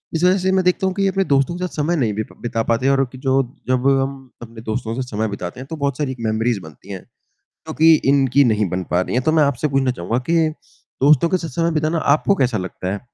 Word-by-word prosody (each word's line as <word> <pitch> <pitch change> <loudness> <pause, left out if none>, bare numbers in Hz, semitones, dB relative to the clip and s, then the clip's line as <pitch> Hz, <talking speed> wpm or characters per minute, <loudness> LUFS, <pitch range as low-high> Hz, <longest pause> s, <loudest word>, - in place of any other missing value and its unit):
इस 165 - -1
वजह 185 +1 +4
से 190 0 0
मैं 190 0 +2
देखता 180 +1 +2
हूँ 190 - -1
कि 200 - -2
ये - - +3
अपने 195 0 0
दोस्तों 140 +2 +1
के 180 0 -2
साथ - - -15
समय 155 +3 0
नहीं 120 -9 0
बिप 110 +1 -5
बिता 115 -1 -2
पाते 115 +3 0
हैं 135 - +4
और 135 - +2
एक 130 -1 -4
जो 135 0 +2 0.3
जब 130 +1 +1
हम 135 +1 0 0.3
अपने 115 -1 -10
दोस्तों 110 0 -3
से 130 - -2
समय 110 -1 -2
बिताते 100 0 -6
हैं 130 - -8
तो 160 - -6
बहुत 140 -3 -2
सारी 140 -3 -2
मेमोरीज़ 110 0 0
बनती 80 +2 -14
हैं, 95 -2 -6 0.7
जो - - -3
कि 160 +4 +6 0.2
इनकी 140 0 +3
नहीं 105 -4 +1
बन 90 +2 -3
पा 90 - +2
रही 90 - -3
है। 125 - +2
तो - - -1
मैं 160 -1 +4
आपसे 140 +1 0
पूछना 135 -2 +1
चाहूँगा 115 0 -2
कि 165 -1 +3 0.5
दोस्तों 150 +3 +5
के 185 - +1
साथ 170 -2 -5
समय 165 0 +2
बिताना 155 +2 0 0.2
आपको 200 +6 +1
कैसा 125 - +1
लगता 90 0 -5
है? 100 - -4
135 Hz, 265 wpm, -20 LUFS, 115-160 Hz, 0.7 s, कि